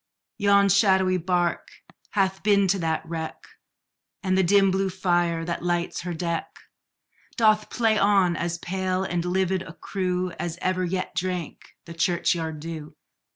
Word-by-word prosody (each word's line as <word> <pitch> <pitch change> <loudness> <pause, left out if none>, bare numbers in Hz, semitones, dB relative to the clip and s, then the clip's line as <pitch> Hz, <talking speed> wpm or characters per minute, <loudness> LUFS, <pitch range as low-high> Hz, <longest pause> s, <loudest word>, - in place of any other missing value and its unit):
Yon 200 -1 +4
shadowy 190 -2 +3
bark 175 0 0 0.5
hath 190 -1 +1
been 200 -2 +3
to 195 +1 +2
that 160 -1 -2
wreck, 160 -1 -5 0.8
And 185 -1 +1
the 190 - +4
dim 195 +1 +4
blue 190 +1 0
fire, 175 -3 0
that 170 0 -3
lights 175 0 -1
her 175 0 -4
deck, 170 0 -2 0.9
Doth 215 -2 +3
play 225 -3 +2
on 195 -3 +3
as 170 0 -2
pale 185 +1 -2
and 175 -2 -2
livid 185 +1 0
a 165 - -9
crew, 185 -1 -2
As 170 -1 -3
ever 185 0 0
yet 185 +1 -2
drank 180 -3 -4
the 170 - -9
churchyard 165 -2 0
dew. 155 -1 -7
185 Hz, 150 wpm, -25 LUFS, 170-190 Hz, 0.9 s, Yon